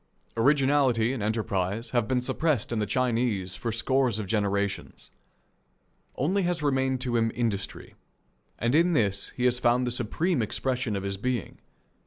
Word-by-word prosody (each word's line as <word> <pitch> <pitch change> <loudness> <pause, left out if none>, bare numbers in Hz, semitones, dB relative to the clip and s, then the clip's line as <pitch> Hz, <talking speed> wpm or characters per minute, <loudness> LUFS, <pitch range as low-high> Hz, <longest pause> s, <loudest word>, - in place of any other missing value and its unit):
Originality 130 -2 +3
and 130 - -4
enterprise 105 0 -1
have 120 -3 +1
been 130 -1 +1
suppressed 145 -2 0
in 115 - 0
the 105 - -1
Chinese 115 -6 0
for 115 - -3
scores 125 0 +1
of 110 - -3
generations. 100 -1 -2 1.0
Only 185 +9 +1
has 175 -3 -1
remained 130 -2 +1
to 125 -2 0
him 115 0 +1
industry, 105 -5 -3 0.6
and 120 +2 0
in 170 +3 +4
this 100 -7 +1
has 125 0 +3
he 125 - -4
found 120 +1 +3
the 125 - -1
supreme 130 - 0
expression 125 0 -1
of 100 - -3
his 100 0 -3
being. 125 +3 -3
120 Hz, 155 wpm, -27 LUFS, 105-130 Hz, 1.0 s, in